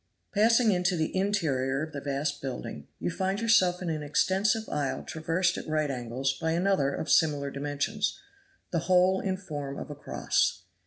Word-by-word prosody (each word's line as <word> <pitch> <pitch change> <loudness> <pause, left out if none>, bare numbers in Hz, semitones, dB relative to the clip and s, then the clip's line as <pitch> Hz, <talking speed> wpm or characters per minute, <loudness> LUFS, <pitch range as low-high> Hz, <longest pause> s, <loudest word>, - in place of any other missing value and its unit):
Passing 225 +2 +4
into 180 -1 +1
the 160 +1 -1
interior 150 -9 0
of 155 0 -7
the 140 - -5
vast 140 +1 -2
building, 130 -2 -6
you 85 +2 -2
find 190 +1 -1
yourself 185 -6 +3
in 175 - -2
an 155 -1 -3
extensive 190 +9 +1
aisle 145 -3 -2
traversed 165 +3 0
at - - -9
right 155 -2 0
angles 130 +2 -2
by 160 0 +1
another 175 -5 +2
of 155 - -4
similar 145 -4 +3
dimensions, 145 +10 -2 0.5
the 170 - +1
whole 185 +1 +5
in 190 -1 -1
form 145 -7 -6
of - - -6
a - - -6
cross. 90 -9 0
160 Hz, 170 wpm, -28 LUFS, 140-190 Hz, 0.5 s, whole